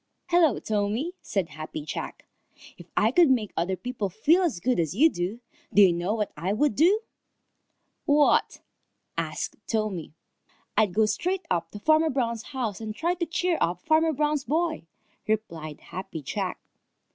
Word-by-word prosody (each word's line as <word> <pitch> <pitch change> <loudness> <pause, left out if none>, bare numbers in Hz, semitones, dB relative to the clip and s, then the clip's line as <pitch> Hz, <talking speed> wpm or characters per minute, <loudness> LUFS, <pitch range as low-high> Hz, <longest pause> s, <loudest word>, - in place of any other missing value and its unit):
"Hello, 340 -8 +4
Tommy," 215 - -1
said 190 -5 -2
Happy 155 -1 -7
Jack. - - -6 0.5
"If 175 - -13
I 220 +2 +4
could 335 +2 +5
make 230 -6 +1
other 180 +3 0
people 230 -2 -3
feel 310 - +3
as 320 - 0
good 250 +2 +1
as 165 +1 -1
you 310 +8 +5
do, 185 +7 -3 0.3
do 205 - +7
you 185 -3 +6
know 175 +5 -1
what 210 -2 -2
I 180 +6 -1
would 290 +5 +2
do?" 370 +9 +4 1.0
"What?" 290 -1 +3 0.5
asked - - -3
Tommy. 210 -9 -2 0.6
"I'd 200 -4 +2
go 220 0 +4
straight 355 - -1
up 170 -1 0
to 205 - -9
Farmer 315 +6 +4
Brown's 235 -5 -1
house 235 -7 -3
and 215 -1 -5
try 340 +7 0
to 345 -1 -3
cheer 340 +1 0
up 175 +1 +1
Farmer 320 +1 +3
Brown's 300 -1 0
boy," 315 - -1 0.4
replied 170 -9 -3
Happy 170 -4 -7
Jack. - - -3
220 Hz, 160 wpm, -26 LUFS, 190-310 Hz, 1.0 s, do